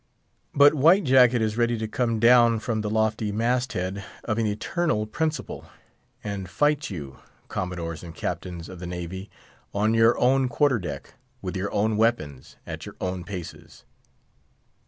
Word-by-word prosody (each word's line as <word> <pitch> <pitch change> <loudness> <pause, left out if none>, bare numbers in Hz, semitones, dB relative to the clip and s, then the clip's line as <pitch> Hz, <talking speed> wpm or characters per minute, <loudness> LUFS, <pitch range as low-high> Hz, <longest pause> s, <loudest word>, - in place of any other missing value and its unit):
But 145 +1 +7
White 165 +7 +5
Jacket 125 -4 +5
is 110 0 -1
ready 120 0 +2
to 110 0 -3
come 115 0 -1
down 120 0 +6
from 110 0 -2
the 105 - -3
lofty 110 0 0
mast 120 +4 0
head 95 +2 -3 0.2
of 110 -1 -1
an 110 - +1
eternal 105 +3 -1
principle, 155 +7 -3 0.5
and 100 -3 -5
fight 145 - +1
you—Commodores 85 +1 -6
and 85 -2 -9
Captains 85 -2 -5
of 95 - -10
the 90 - -6
navy—on 95 +4 -4
your 115 +1 +4
own 130 +1 +3
quarter 130 -1 +2
deck, 75 -7 -7 0.3
with 95 +1 -4
your 95 +2 -2
own 105 +1 +1
weapons, 75 - -1
at - - -7
your - - -10
own 90 -1 -3
paces. 90 -3 -9
110 Hz, 150 wpm, -25 LUFS, 95-120 Hz, 0.5 s, But